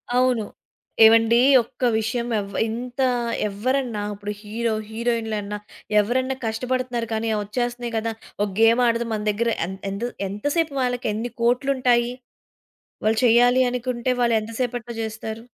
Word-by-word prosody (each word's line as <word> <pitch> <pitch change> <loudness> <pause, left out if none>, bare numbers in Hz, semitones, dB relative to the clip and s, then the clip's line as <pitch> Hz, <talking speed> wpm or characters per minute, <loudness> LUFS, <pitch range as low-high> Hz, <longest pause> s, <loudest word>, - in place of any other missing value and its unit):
అవును. 250 -3 +3 0.6
ఏవండీ 225 +1 +6 0.2
ఒక్క 235 - -15 0.2
విషయం 230 +2 -1
ఎవ్వ 200 0 -6
ఇంత 245 +4 -4 0.5
ఎవ్వరన్నా 235 +2 -1
ఇప్పుడు 205 +1 -6
హీరో 225 +2 -2 0.2
హీరోయిన్‌లన్నా 220 -3 -2 0.4
ఎవరన్నా 255 +5 -1
కష్టపడుతున్నారు. 245 +1 -2
కాని, 220 +1 -1
ఒచ్చేస్తున్నాయి 240 +2 -3
కదా 225 +1 -1 0.3
ఒక 205 - +1
గేమ్ 230 +2 +5
ఆడదాం. 230 0 0
మన 215 - -2
దగ్గర 230 +3 0 0.2
ఎం 190 - -5 0.2
ఎంత 200 +3 -4 0.3
ఎంత 205 +6 -8
సేపు 325 -4 +1
వాళ్ళకి 245 -1 -1
ఎన్ని 230 +3 -3
కోట్లుంటాయి. 245 -1 +2 0.9
వాళ్ళు 220 +1 +2
చెయ్యాలి 245 +2 +5
అనుకుంటే 250 0 -2
వాళ్ళెంత 225 -2 +1
సేపట్లో 240 -1 -4
చేస్తారు? 220 +1 -6
235 Hz, 125 wpm, -23 LUFS, 220-245 Hz, 0.9 s, ఏవండీ